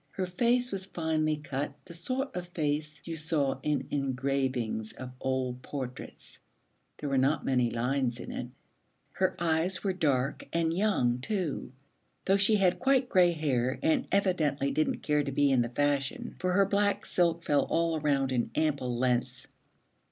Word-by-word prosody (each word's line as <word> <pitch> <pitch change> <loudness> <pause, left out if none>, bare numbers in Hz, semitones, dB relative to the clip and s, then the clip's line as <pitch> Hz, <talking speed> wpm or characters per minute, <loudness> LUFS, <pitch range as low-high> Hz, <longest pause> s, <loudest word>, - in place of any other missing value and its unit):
Her 190 - -3
face 240 +7 +1
was 190 -1 -4
finely 155 -3 0
cut, 145 -1 -4
the 175 - -11
sort 255 +11 -3
of 180 -1 -4
face 150 -2 -2
you 165 - -4
saw 150 -3 0
in 150 -1 -1
engravings 130 -5 -1
of 130 -1 -8
old 130 -1 -2
portraits; 130 -2 -7 0.6
there 150 - -5
were 135 -1 +2
not 135 +4 +1
many 125 -3 +2
lines 125 +1 -1
in - - -7
it. - - -4 0.6
Her - - 0
eyes 170 +2 +1
were 195 -2 +1
dark 140 -6 0
and 165 0 +1
young 170 - +2
too, 175 - -3 0.5
though 195 +1 +4
she 200 +2 +4
had 185 -3 +2
quite 265 -2 +2
gray 180 -2 +5
hair 130 -5 0
and 305 -4 +2
evidently 155 -8 +1
didn't 155 - 0
care 150 -1 +2
to 140 - -3
be 140 +1 +3
in 130 -2 +4
the 120 - -1
fashion, 140 +1 -1
for 185 0 0
her 195 +1 +5
black 205 +1 +1
silk 170 -1 +1
fell 145 -3 +2
all 165 -1 +1
around 140 -3 +1
in 120 -3 0
ample 140 -6 0
lengths. 125 0 0
150 Hz, 165 wpm, -29 LUFS, 130-180 Hz, 0.6 s, gray